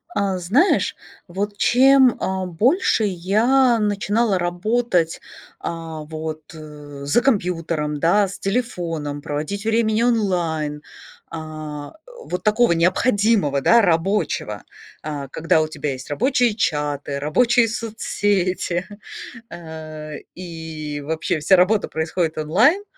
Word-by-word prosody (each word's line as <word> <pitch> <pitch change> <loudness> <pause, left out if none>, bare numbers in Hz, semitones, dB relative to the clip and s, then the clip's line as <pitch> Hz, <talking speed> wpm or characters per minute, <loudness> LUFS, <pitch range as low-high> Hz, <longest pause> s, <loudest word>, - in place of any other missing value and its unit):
А 195 -2 0
знаешь, 235 - +2 0.3
вот 200 +3 -4
чем, 260 +1 +5
а, 190 0 -2
больше 230 - +2
я 220 +7 +2
начинала 210 0 +1
работать, 175 0 0 0.4
а, 165 -1 -6
вот, 155 0 -6
э, 150 -2 -11
за 145 +12 +3
компьютером, 165 - -1
да, 195 +6 +3
с 185 - -9
телефоном, 170 -10 -3
проводить 155 +9 -4
времени 225 0 +2
онлайн, 175 -10 0 0.5
а, 155 -2 -7 0.2
о, - - -13
вот 180 - -4
такого 225 +1 +3
необходимого, 185 - +2
да, 235 +10 +5
рабочего, 190 +2 0 0.4
а, 145 -3 -5
когда 160 +3 +1
у 155 - 0
тебя 150 -2 -4
есть 130 +1 -8
рабочие 245 - +1
чаты, 145 -6 -1
рабочие 230 - +3
соцсети, 205 -5 -1 0.6
э, 155 -2 -8 0.2
и 160 -4 -7
вообще 160 +1 -1
вся 190 +6 +4
работа 190 +3 +3
происходит 160 +1 -2
онлайн, 225 - +3
180 Hz, 110 wpm, -21 LUFS, 155-220 Hz, 0.6 s, чем